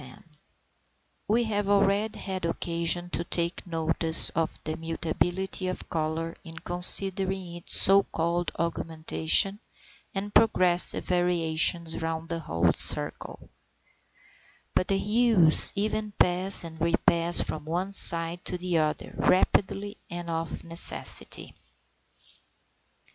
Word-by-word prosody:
710. 145 +4 -18 0.9
We 230 +3 +1
have 205 -3 -3
already 200 +1 0
had 190 -2 -7
occasion 170 +1 -2
to 170 - -3
take 170 +1 -3
notice 165 0 0
of 165 -1 -3
the 155 0 -5
mutability 175 +3 -4
of 185 - -6
colour 165 0 -4
in 165 -2 -12
considering 185 +1 +3
its 175 0 +1
so 195 +1 +4
called 170 -1 -3
augmentation 165 +4 +1 0.6
and 205 +1 -5
progressive 180 -5 +3
variations 170 -2 0
round 165 0 -5
the 170 0 -4
whole 85 - -1
circle; - - +2 1.3
but 185 - 0
the 195 - 0
hues 210 -6 +3
even 210 +1 -3
pass 185 +1 +2
and 160 -1 -11
repass 170 0 +1
from 155 -1 -7
one 180 +5 -4
side 170 -2 +3
to 180 - -3
the 175 -2 -2
other, 155 -1 -4
rapidly 200 +2 0
and 175 -1 -7
of 165 0 -5
necessity. 165 0 +1
175 Hz, 115 wpm, -25 LUFS, 165-195 Hz, 1.3 s, so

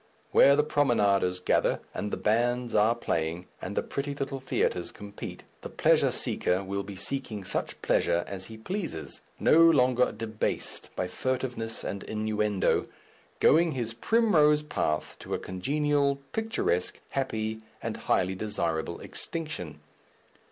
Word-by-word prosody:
Where 140 - +7
the 150 - +3
promenaders 105 -11 +2
gather, 90 - +2
and 105 - -3
the - - -3
bands 120 +2 +1
are 110 +2 +4
playing, 85 -5 -2 0.2
and 100 - -5
the - - +2
pretty 140 0 -3
little 135 -1 -3
theatres 90 -8 -1
compete, 100 0 -8 0.2
the - - -7
pleasure - - +3
seeker 90 +2 0
will 100 +1 -2
be 100 0 -8
seeking 110 -2 -3
such 95 - -3
pleasure 85 0 +2
as 95 -1 -6
he 110 +3 -10
pleases, 165 - -4 0.2
no 160 - +5
longer 130 -7 +5
debased 110 0 -2
by - - -1
furtiveness 120 +2 -3
and 100 - -4
innuendo, 105 -2 0 0.5
going 165 0 +5
his 115 -3 -3
primrose 150 - +3
path 75 - -2
to - - -4
a - - -1
congenial, 140 +8 0 0.2
picturesque, 220 - -1
happy 110 -5 -2 0.2
and - - -3
highly 95 +1 +1
desirable 85 -5 -2
extinction. 90 - -5
115 Hz, 135 wpm, -28 LUFS, 100-140 Hz, 0.5 s, Where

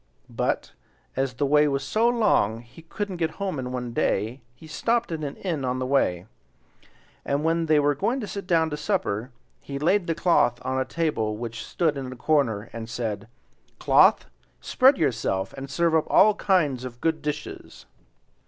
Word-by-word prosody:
But, - - -2 0.4
as 130 -1 -1
the 145 - 0
way 150 +1 +4
was 140 -1 -1
so 220 +11 +1
long 200 - +2
he 120 +7 -16
couldn't 190 +3 -5
get 160 -2 -1
home 190 -7 -3
in 125 -1 -4
one 125 -2 -4
day, 115 +4 -1
he 160 - -15
stopped 230 +8 -1
at 160 -2 -4
an 140 - -4
inn 165 -7 -3
on 125 0 -1
the 130 - -2
way; 95 -10 +1 1.0
and 140 +2 -1
when 165 0 +1
they 155 -1 +4
were 145 0 +3
going 235 - -1
to 225 - -4
sit 200 -2 -7
down 160 -3 +2
to 150 - -3
supper, 130 - -2 0.3
he 140 - -7
laid 175 +6 +1
the 165 - 0
cloth 165 -8 +2
on 130 +1 -1
a 130 - 0
table 130 -8 -1
which 115 -1 -6
stood 155 +3 -1
in 130 -1 -5
the 130 - -8
corner 120 -6 0
and 115 0 -7
said: 110 -3 -4 0.5
"Cloth, - - +4 0.3
spread 265 +2 +4
yourself, 110 -9 -1
and 135 0 -8
serve 170 +3 +1
up 160 -1 +2
all 215 +1 +6
kinds 160 -11 +1
of 120 -2 -8
good 160 +2 0
dishes." 150 0 -6
145 Hz, 185 wpm, -25 LUFS, 125-165 Hz, 1.0 s, all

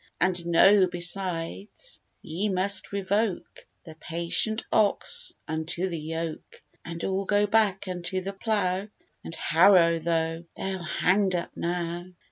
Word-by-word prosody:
And 180 -1 0
know, 190 +3 +6
besides, 180 - -3 0.2
ye 185 +7 -2
must 195 +1 +1
revoke 200 +1 -2 0.2
The 160 - -11
patient 170 +7 0
ox 480 - +2 0.2
unto 160 +3 -2
the 170 -2 -4
yoke, 160 +1 -6 0.2
And 165 0 -7
all 195 +1 -1
go 205 +1 +2
back 205 -2 +1
unto 180 0 -2
the 195 +2 -5
plough 195 -2 -1 0.4
And 165 - -7
harrow, 170 0 +5
though 165 0 -1
they're 190 -1 -4
hang'd 185 +3 +1
up 170 - -4
now. 175 0 -3
180 Hz, 125 wpm, -26 LUFS, 170-200 Hz, 0.4 s, know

